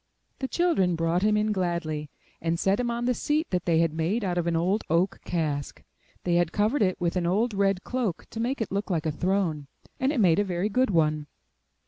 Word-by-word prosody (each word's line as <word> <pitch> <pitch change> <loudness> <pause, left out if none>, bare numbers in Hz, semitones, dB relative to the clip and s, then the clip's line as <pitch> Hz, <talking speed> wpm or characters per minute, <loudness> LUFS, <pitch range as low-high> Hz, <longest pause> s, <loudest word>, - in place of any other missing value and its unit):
The 265 - -2
children 295 - +2
brought 165 +2 +1
him 210 +1 +3
in 215 0 +1
gladly, 170 -6 -2 0.3
and 165 0 -1
set 195 +4 +2
him 245 -1 0
on 235 0 -2
the 250 - +2
seat 300 +6 -1
that 180 -2 -1
they 170 -2 +3
had 165 -1 +2
made 170 +8 0
out 180 -2 -1
of 170 - -1
an 170 - +1
old 185 +6 +1 0.4
cask. 150 -5 -2 0.4
They 175 - 0
had 175 -1 +2
covered 215 +9 +1
it 185 -3 +1
with 175 0 -1
an 175 -2 0
old 215 +6 +1
red 195 -1 +1
cloak 245 -9 -2
to 225 - -6
make 245 +3 -1
it 220 - -2
look 200 +2 -2
like 165 -4 -1
a 155 - +1
throne, 170 -3 -1 0.3
and 265 +2 +2
it 290 - -1
made 175 -5 +4
a - - +3
very 185 +1 -1
good 255 +5 +2
one. 155 -4 +1
185 Hz, 220 wpm, -27 LUFS, 165-215 Hz, 0.4 s, made